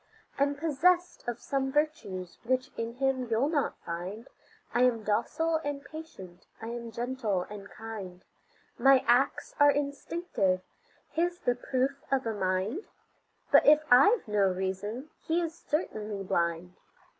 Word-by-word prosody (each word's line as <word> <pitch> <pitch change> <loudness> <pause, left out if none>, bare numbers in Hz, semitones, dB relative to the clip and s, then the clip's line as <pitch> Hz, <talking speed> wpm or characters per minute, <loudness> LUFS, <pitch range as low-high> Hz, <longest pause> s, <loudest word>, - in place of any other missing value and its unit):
I'm 285 +1 +2
possessed 345 +4 +2
of 240 0 -2
some 270 -1 -1
virtues 265 - -2
which 255 +2 0
in 230 +1 -4
him 260 -1 0
you'll 230 +6 +2
not 295 -4 0
find, 185 +8 -5 0.5
I 240 - +2
am 240 -3 +3
docile 320 +10 +1
and 285 -1 -4
patient, 195 - -10
I 225 - -6
am 235 0 -5
gentle 235 -6 -1
and 205 -1 -8
kind; 200 -5 -8 0.6
My 270 -1 +6
acts 250 +3 +2
are 290 0 +7
instinctive; 280 - 0 0.5
his 345 +2 0
the 245 - +1
proof 260 +3 -1
of 265 -2 +1
a 225 - -1
mind; 190 - -1 0.7
But - - +6
if 305 +1 +7
I've 280 - +6
no 205 -2 +3
reason, 190 +9 -4 0.2
his 330 0 +1
is - - -20
certainly 215 - -3
blind. 170 -1 -1
250 Hz, 140 wpm, -29 LUFS, 205-290 Hz, 0.7 s, are